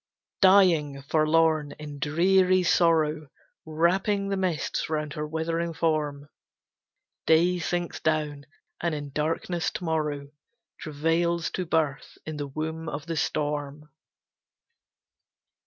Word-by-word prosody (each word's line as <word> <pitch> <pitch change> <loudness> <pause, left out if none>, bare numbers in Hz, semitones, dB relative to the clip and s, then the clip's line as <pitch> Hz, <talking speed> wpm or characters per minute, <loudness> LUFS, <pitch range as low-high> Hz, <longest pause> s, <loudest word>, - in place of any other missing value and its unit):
Dying, 170 -8 +4
forlorn, 155 0 +2
in 150 -1 -9
dreary 185 +5 +3
sorrow, 160 -3 +2 0.4
Wrapping 190 +5 +1
the 200 - 0
mists 185 -6 -2
round 150 -1 -2
her 150 0 -4
withering 165 +1 -2
form, 150 -3 -1 1.0
Day 175 +3 +4
sinks 175 0 -2
down; 150 -2 -1 0.3
and 170 -2 0
in 145 -1 -6
darkness 165 +3 -1
to - - -7
morrow 150 -4 -2 0.5
Travails 165 +3 0
to 180 -2 -3
birth 155 -4 -1
in 155 -1 -5
the 145 -1 -4
womb 160 +3 -4
of 145 +1 -6
the 165 0 -3
storm. 150 -1 -2
160 Hz, 110 wpm, -26 LUFS, 150-170 Hz, 1.0 s, Dying